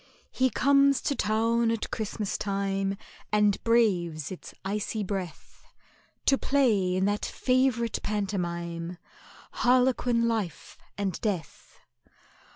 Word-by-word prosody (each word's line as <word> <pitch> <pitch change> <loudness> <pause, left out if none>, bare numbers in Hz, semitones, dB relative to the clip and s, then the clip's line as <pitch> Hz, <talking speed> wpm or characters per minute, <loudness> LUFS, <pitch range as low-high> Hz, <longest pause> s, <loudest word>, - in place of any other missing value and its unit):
He 260 0 +2
comes 275 +3 +4
to - - 0
town 230 +2 +1
at 230 -1 -2
Christmas 215 -2 -3
time, 195 -1 -1 0.3
And 210 -1 +2
braves 180 -10 +1
its 185 - -8
icy 210 +2 -2
breath, 185 -4 -6 0.6
To 270 - +4
play 215 -10 +2
in 190 +1 +1
that 205 +1 0
favourite 255 -3 +1
pantomime, 175 -4 -3 0.5
Harlequin 250 -1 +2
Life 220 -7 -3 0.2
and 195 -4 -2
Death. 195 -7 -4
210 Hz, 105 wpm, -28 LUFS, 190-235 Hz, 0.6 s, comes